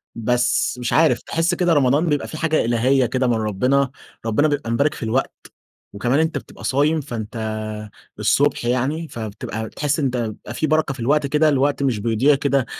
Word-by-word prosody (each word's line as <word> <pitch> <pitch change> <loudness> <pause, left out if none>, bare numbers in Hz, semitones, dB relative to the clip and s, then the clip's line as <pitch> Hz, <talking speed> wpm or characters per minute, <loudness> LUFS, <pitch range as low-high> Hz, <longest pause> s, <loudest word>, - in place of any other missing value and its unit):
بس 125 +2 +1
مش 120 - -2
عارف، 160 0 +3
تحس 165 +2 0
كده 175 -2 +2
رمضان 145 +3 +3
بيبقى 145 -1 0
في 155 - -7
حاجة 160 -4 +1
إلهية 125 +3 +2
كده 130 +1 0
من 120 - +2
ربنا. 125 +6 +1 0.3
ربنا 115 +7 +2
بيبقى 145 -5 -2
مبارك 140 +6 +1
في - - -8
الوقت، 115 +4 0 0.6
وكمان 120 +8 +1
أنت 160 0 0
بتبقى - - -11
صايم، 150 +4 +1
فأنت 120 -4 -6 0.8
الصبح 145 -3 +2
يعني 135 +7 -1
فبتبقى 110 -1 -6
بتحس 145 +5 -2
إن 140 - 0
أنت 125 -1 -1
بيبقى 115 0 -5
في 155 +5 -1
بركة 155 -2 +1
في 130 - -12
الوقت 140 +4 +1
كده. 150 +2 +3
الوقت 140 0 +1
مش 120 -6 0
بيضيع 120 +6 +3
كده، 140 -2 +1
135 Hz, 185 wpm, -21 LUFS, 120-150 Hz, 0.8 s, عارف